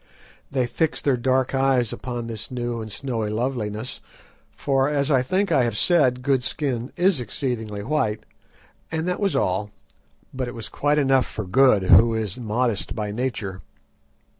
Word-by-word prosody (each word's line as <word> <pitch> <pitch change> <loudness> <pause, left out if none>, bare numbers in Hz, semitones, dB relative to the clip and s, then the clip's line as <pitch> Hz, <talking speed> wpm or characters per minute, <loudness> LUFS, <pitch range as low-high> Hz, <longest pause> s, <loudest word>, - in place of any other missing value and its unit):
They 130 -2 0
fixed 155 +6 -1
their 140 -3 +3
dark 130 +2 +1
eyes 135 -4 +2
upon 120 -2 -5
this 115 -2 -6
new 120 -2 -3
and 110 -1 -7
snowy 115 -2 -3
loveliness, 110 -1 -3 0.5
for, 135 0 +1
as 145 0 +1
I 130 -3 +4
think 185 +8 0
I 135 - +4
have 115 -3 -1
said, 130 - +3
Good's 135 -2 +1
skin 130 -4 -3
is 180 -5 +3
exceedingly 110 -3 -4
white, 110 -5 -1 0.7
and 160 +1 -2
that 180 - -1
was 200 -2 0
all. 95 +3 0 0.6
But 130 -1 -3
it 120 - -7
was 115 -2 -6
quite 145 +1 +1
enough 135 -3 +3
for 110 - -5
Good, 105 +1 +4
who 110 +6 +6
is 110 0 -3
modest 115 -1 -1
by 105 -2 -3
nature. 105 -5 -3
125 Hz, 165 wpm, -23 LUFS, 110-135 Hz, 0.7 s, who